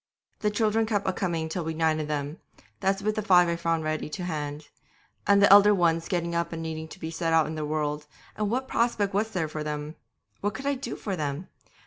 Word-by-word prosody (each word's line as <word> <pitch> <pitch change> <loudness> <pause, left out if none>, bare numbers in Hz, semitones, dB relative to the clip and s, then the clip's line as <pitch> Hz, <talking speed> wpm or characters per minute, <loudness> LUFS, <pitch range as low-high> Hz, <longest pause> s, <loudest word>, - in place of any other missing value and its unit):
'The 210 - +1
children 220 +1 +1
kept 205 -3 0
a 190 - +2
coming 170 -4 -1
till 170 +2 -3
we'd 160 0 -4
nine 160 -1 +2
of 155 - -3
them, 145 +1 -3 0.4
that's 195 +1 0
with 215 +1 +1
the 215 - -2
five 180 -4 +5
I 170 - 0
found 165 -1 0
ready 155 0 -2
to 180 - -5
hand; 150 -3 -4 0.6
and 200 0 +5
the 200 - +8
elder 205 +1 +8
ones 165 -2 +2
getting 170 -2 -1
up 170 0 -1
and 165 - -4
needing 160 -1 -4
to - - -12
be 160 - -5
set 165 0 -1
out 160 -1 +5
in 155 - -4
the 155 -1 -3
world, 150 -1 -2 0.3
and 210 -1 -1
what 260 +4 -1
prospect 215 -5 +1
was 210 +3 +1
there 180 -7 -1
for 155 0 -5
them? 150 0 -4 0.5
What 205 +1 -2
could 270 - -6
I 280 - +2
do 255 -3 -5
for 200 -3 -4
them? 150 +1 -4
170 Hz, 240 wpm, -27 LUFS, 155-200 Hz, 0.6 s, the